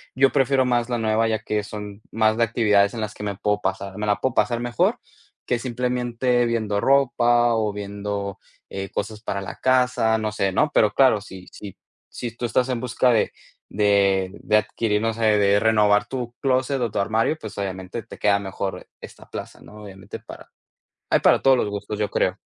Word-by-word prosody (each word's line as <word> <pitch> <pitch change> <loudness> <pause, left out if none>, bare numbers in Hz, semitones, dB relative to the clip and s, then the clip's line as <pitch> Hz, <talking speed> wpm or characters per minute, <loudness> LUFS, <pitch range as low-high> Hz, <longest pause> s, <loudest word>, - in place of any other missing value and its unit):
yo 135 +1 +4
prefiero 135 -1 +3
más 120 -1 0
la 120 - 0
nueva 110 0 +1
ya 110 - 0
que 105 0 -2
son 105 0 -8
más 110 0 +2
de 115 - +3
actividades 105 -3 +2
en 115 - -4
las 105 -1 -4
que 105 - -9
me 100 -2 -3
puedo 105 +1 -1
pasar 95 +1 -3
me 105 - -3
la 105 - +1
puedo 130 - 0
pasar 120 -1 +1
mejor, 120 -2 0 0.5
que 125 - 0
simplemente 125 0 0
viendo 110 -3 -1
ropa 120 -3 +3
o 110 -2 0
viendo, 100 -1 -5 0.3
eh, 95 0 -5
cosas 105 +1 -4
para 100 -3 -3
la 95 - -7
casa, 125 -3 +2
no 110 -1 -2
sé, 100 -2 0
¿no?, 150 +8 +2
pero 105 -1 +3
claro 130 -6 +4
si 95 -2 -11
si 100 -3 -10 0.3
si 115 -2 -6
tú - - -8
estás 125 +3 +1
en 125 -2 -2
busca 125 0 +2
de 110 - +2 0.4
de 100 -2 +2
de 105 - +3
adquirir 105 0 0
no 115 0 0
sé, 115 0 -4
de 100 0 +4
renovar 105 -2 +3
tu 125 -2 -4
clóset 130 0 +1
o 115 -3 -1
tu 105 - -2
armario, 110 +9 +1
pues, 110 -6 -9
obviamente 95 +2 -5
te - - -12
queda 100 -1 +3
mejor 95 -1 -5
esta - - -12
plaza, - - -8
¿no?, 105 0 -13
Obviamente 95 -2 -10
para - - -13 0.6
Hay - - +5
para - - +5
todos 135 -1 +5
los 105 - 0
gustos, 105 +1 -5
yo 105 - 0
creo. 90 +2 0
110 Hz, 200 wpm, -23 LUFS, 100-120 Hz, 0.6 s, Hay